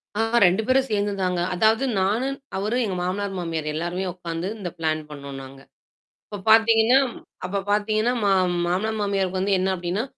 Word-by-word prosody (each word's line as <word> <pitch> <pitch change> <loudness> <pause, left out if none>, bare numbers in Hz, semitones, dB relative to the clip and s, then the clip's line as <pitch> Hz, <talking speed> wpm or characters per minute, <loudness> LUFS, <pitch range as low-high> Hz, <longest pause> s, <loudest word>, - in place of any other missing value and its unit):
ஆ - - -2 0.3
2 185 +5 +3
பேரும் 265 +1 +3
சேர்ந்து 205 0 0
தாங்க. 180 -1 0
அதாவது 220 +7 +3 0.2
நானு 220 +7 +1 0.3
அவரு 210 +5 -1
எங்க 190 - -3
மாமனார், 195 +2 -2
மாமியார் 165 -3 -3
எல்லாருமே 175 +3 -2
உட்காந்து 170 0 -5
இந்த 180 - -4
பிளான் 155 -1 -1
பண்ணோம் 140 -2 -8
நாங்க. 135 +1 -12 0.7
இப்ப 205 - -7
பார்த்தீங்கன்னா 225 +3 +5 0.5
அப்ப 195 +2 -2
பார்த்தீங்கன்னா 215 +3 +1
மா 200 - +3 0.4
மாமனார் 215 +5 -1
மாமியாருக்கு 195 -2 -1
வந்து 195 +1 +1
என்ன 190 +1 0
அப்டின்னா, 180 +5 -2
195 Hz, 160 wpm, -23 LUFS, 175-215 Hz, 0.7 s, பார்த்தீங்கன்னா